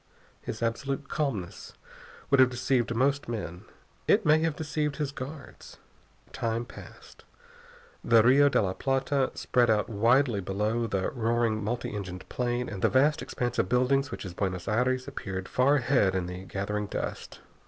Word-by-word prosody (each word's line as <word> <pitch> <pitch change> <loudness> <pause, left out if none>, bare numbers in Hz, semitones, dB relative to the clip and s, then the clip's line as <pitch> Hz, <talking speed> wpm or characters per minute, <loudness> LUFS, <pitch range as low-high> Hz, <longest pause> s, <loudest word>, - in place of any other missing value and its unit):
His 110 - -5
absolute 135 +4 -2
calmness 115 - -3 0.6
would 140 - +5
have 130 -1 +7
deceived 120 -1 0
most 135 +2 +1
men. 95 -7 -5 0.4
It - - +4
may 155 +1 +5
have 160 -1 0
deceived 150 -2 -2
his 145 -2 -2
guards. 140 +1 -9 0.6
Time 115 +1 -2
passed. - - -13 0.8
The 115 -2 +5
Rio 140 +4 +6
de 140 - +2
la 95 -1 -1
Plata 135 +3 0
spread 120 -2 +2
out 110 +1 +2
widely 115 +2 +3
below 105 +5 -1
the 95 -3 -1
roaring 115 -2 0
multi 120 +3 -3
engined 90 -3 -6
plane 120 0 -1
and 100 -4 -6
the - - +4
vast 145 +3 +3
expanse 120 -1 -3
of - - +1
buildings 135 +3 +2
which 115 - -7
is 90 - -6
Buenos 90 -1 -3
Aires 130 +4 +1
appeared 95 -8 -5
far 135 +3 +3
ahead 120 -8 +2
in 95 -2 -1
the 90 +1 -7
gathering 105 +2 -3
dusk. - - -5
120 Hz, 160 wpm, -28 LUFS, 105-135 Hz, 0.8 s, have